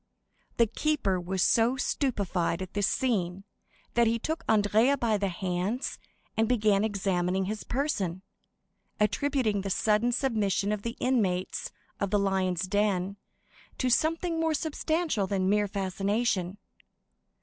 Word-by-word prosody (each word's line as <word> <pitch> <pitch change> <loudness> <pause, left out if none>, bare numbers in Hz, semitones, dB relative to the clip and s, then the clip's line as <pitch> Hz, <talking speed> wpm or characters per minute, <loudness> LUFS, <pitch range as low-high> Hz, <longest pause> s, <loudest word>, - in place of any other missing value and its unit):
The 235 - +5
keeper 230 -6 0
was 185 +1 -1
so 235 +3 +3
stupefied 195 - -1
at 185 - -10
this 205 -1 +1
scene 195 -7 0 0.5
that 235 -1 +4
he 230 +1 +2
took 315 +8 -3
Andrea 220 +5 +4
by 230 -4 +1
the 200 - 0
hands 185 +6 -2 0.4
and 220 0 +1
began 210 -4 +3
examining 190 -3 0
his 215 +2 -4
person, 200 - -2 0.8
attributing 220 -1 +1
the 195 - -4
sudden 215 +4 +2
submission 215 -6 0
of 210 -1 -2
the 230 +2 -5
inmates 195 -8 0 0.3
of 200 - -1
the 205 - +2
Lions' 190 -3 0
Den 200 -1 0 0.6
to 255 - 0
something 330 +5 +1
more 320 -1 +1
substantial 315 - -1
than 190 -1 0
mere 205 +1 +2
fascination. 195 0 -1
210 Hz, 130 wpm, -28 LUFS, 190-240 Hz, 0.8 s, The